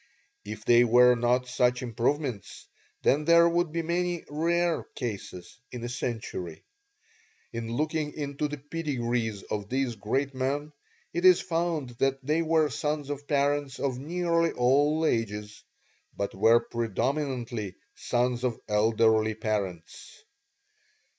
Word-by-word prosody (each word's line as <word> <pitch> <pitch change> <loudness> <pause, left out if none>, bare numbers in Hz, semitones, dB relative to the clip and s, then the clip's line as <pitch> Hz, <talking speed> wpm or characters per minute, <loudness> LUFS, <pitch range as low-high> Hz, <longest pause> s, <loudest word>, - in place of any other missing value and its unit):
If 110 +1 -8
they 120 0 +6
were 125 +1 +6
not 125 +1 +1
such 125 0 +1
improvements, 120 - -2 0.4
then 150 +3 +3
there 170 +1 +6
would 170 -1 +1
be 165 +1 -2
many 175 +1 -1
'rare' 170 +2 0
cases 100 -5 -6
in 125 -2 -7
a 120 - -3
century. 110 -9 -5 0.9
In 115 0 -4
looking 155 +3 -1
into 145 0 -3
the 150 0 -6
pedigrees 125 -8 -2
of 105 -1 -4
these 130 -2 -1
great 130 +7 -1
men 140 +3 -2 0.4
it 175 - -2
is 185 -1 +7
found 165 -7 -2
that 135 0 +2
they 155 +3 +2
were 160 -2 +2
sons 150 -1 -2
of 145 0 -6
parents 145 -1 0
of 130 -3 -1
nearly 170 +2 0
all 145 +6 +3
ages, 105 -4 -2 0.6
but 100 - -2
were 115 +4 +5
predominantly 120 -2 -2 0.2
sons 120 +4 -1
of 125 -3 -1
elderly 110 0 +3
parents. 100 -6 -4
130 Hz, 125 wpm, -28 LUFS, 115-150 Hz, 0.9 s, is